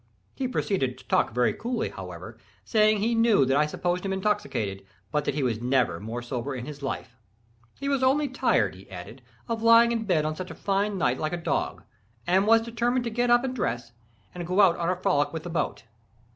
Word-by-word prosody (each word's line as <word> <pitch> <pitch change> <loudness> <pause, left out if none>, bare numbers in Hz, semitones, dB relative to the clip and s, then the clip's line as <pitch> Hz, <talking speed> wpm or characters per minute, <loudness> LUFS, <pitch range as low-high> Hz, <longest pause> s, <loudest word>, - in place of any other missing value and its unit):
He 260 - -2
proceeded 185 - -1
to - - -17
talk - - +2
very 125 +2 +2
coolly, 240 +1 -2
however, - - -9 0.3
saying 215 -1 +4
he 230 +3 +1
knew 225 - +4
that 135 +1 +2
I 150 +1 +3
supposed 175 +3 -2
him 195 - -2
intoxicated, 190 - -1 0.3
but 150 -1 0
that - - -1
he 150 - 0
was 115 -3 -1
never 125 -8 +1
more 115 +3 -5
sober 125 +2 -4
in 125 -1 -5
his 145 0 -8
life. 130 -3 -5 0.6
He 280 - -3
was 275 -2 +1
only 280 +3 +3
tired, 255 - +1
he 95 +1 -15
added, 95 +7 -9 0.3
of 230 -1 -2
lying 230 +1 +6
in 230 -1 -1
bed 165 -6 +2
on 155 0 -1
such 185 +2 -6
a - - -8
fine 200 +1 0
night 125 -7 +1
like 155 +1 -2
a - - -1
dog, 170 - -2 0.4
and 190 +3 +3
was 225 0 +6
determined 240 +2 0
to 235 - -3
get 240 +2 0
up 240 +1 +5
and 260 -1 -3
dress, 120 - -2 0.4
and 175 -1 -6
go 185 +3 0
out 190 -4 +6
on 170 0 -1
a 185 - +1
frolic 180 -6 +1
with 160 -1 -4
the 175 - -6
boat. 165 - -2
180 Hz, 220 wpm, -26 LUFS, -, 0.6 s, lying